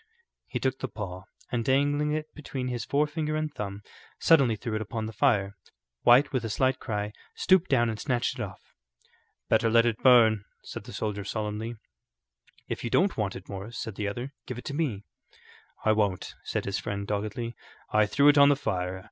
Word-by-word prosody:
He - - -3
took 130 0 -1
the 130 - -2
paw, 95 -4 -7 0.3
and 120 -2 0
dangling 145 +3 +2
it 155 0 -3
between 135 -4 -5
his 120 -1 -3
forefinger 150 +1 0
and 155 -1 -2
thumb, 100 0 -5 0.4
suddenly 135 -9 +5
threw 110 +2 -5
it 110 - -1
upon 110 +1 -4
the 110 - -6
fire. 100 -5 +2 0.5
White, 125 +5 +6
with 130 -2 0
a 115 - -3
slight 130 +4 +1
cry, 105 -2 -3 0.2
stooped 185 -1 +3
down 120 -4 +3
and 110 -1 -3
snatched 130 -1 -1
it - - -2
off. 95 -5 -6 0.9
"Better 115 - +3
let 115 +1 +5
it 115 -2 0
burn," 115 -5 +6 0.2
said - - -8
the - - -9
soldier, 105 -2 -3
solemnly. 110 +3 -3 0.9
"If - - -4
you 120 - -2
don't 190 - +3
want 105 -3 -1
it, 95 - -9
Morris," 100 +4 -7
said 115 - -4
the 105 +1 -3
other, 120 +7 -5
"give 125 - -5
it 125 - -8
to 140 - -4
me." 135 -10 -1 0.8
"I 110 - +5
won't," 105 -4 0
said - - -2
his 100 -1 -1
friend, 100 0 -4
doggedly. 105 +3 -3 0.4
"I 105 0 +4
threw 140 +7 +4
it 145 0 +7
on 140 0 +8
the 145 - +5
fire. 95 -8 -2
115 Hz, 195 wpm, -28 LUFS, 105-135 Hz, 0.9 s, on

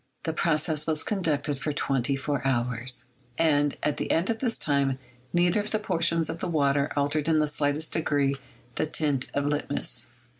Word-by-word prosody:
The 160 -3 -2
process 155 -1 +1
was 155 -1 0
conducted 150 -8 -1
for 150 - -2
twenty 135 -1 0
four 140 +1 -2
hours, 125 -1 0 0.3
and 145 -3 +2
at 150 - 0
the - - -3
end 175 +7 +2
of 225 - -3
this 240 -4 0
time 140 -3 +1 0.3
neither 175 +3 +3
of 205 +1 -2
the 215 - +1
portions 170 -5 +1
of 165 - -5
the - - -2
water 140 -3 +1
altered 145 +2 0
in 160 - +4
the 155 - +3
slightest 145 +1 0
degree 145 -3 +1 0.4
the - - 0
tint 145 -4 0
of 140 0 0
litmus. 145 0 0
150 Hz, 180 wpm, -27 LUFS, 140-165 Hz, 0.4 s, in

